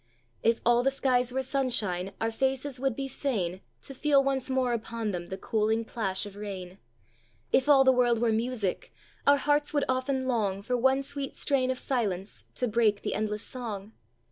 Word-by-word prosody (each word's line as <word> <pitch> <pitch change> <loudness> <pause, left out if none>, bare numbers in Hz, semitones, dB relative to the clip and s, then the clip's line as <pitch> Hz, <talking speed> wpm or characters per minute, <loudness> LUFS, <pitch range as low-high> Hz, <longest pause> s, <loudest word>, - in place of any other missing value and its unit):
"If 230 0 +2
all 240 0 +5
the 265 - +3
skies 255 -2 +1
were 265 +1 -1
sunshine, 230 -9 0
Our 225 0 0
faces 265 +2 -1
would 270 -2 0
be 270 +1 -3
fain 200 -10 -2 0.2
To 275 - -6
feel 280 0 +3
once 270 -1 -1
more 260 -2 +1
upon 225 -1 -3
them 175 -2 -5
The 190 - -4
cooling 220 +2 0
plash 195 -4 -2
of 205 -1 -10
rain. 195 -2 -7 0.7
"If 265 +2 +3
all 275 -2 +7
the 260 - +6
world 245 -2 +3
were 230 0 +2
music, 220 -3 -1 0.4
Our 285 0 +7
hearts 290 +1 +1
would 290 - +2
often 260 +1 0
long 205 -6 0
For 250 +4 -1
one 265 +3 +3
sweet 275 0 -4
strain 260 -2 +1
of 260 - 0
silence 210 -8 -2
To 250 - +1
break 215 -2 +2
the - - -1
endless 210 0 -2
song. 215 -5 -6
245 Hz, 185 wpm, -28 LUFS, 210-265 Hz, 0.7 s, all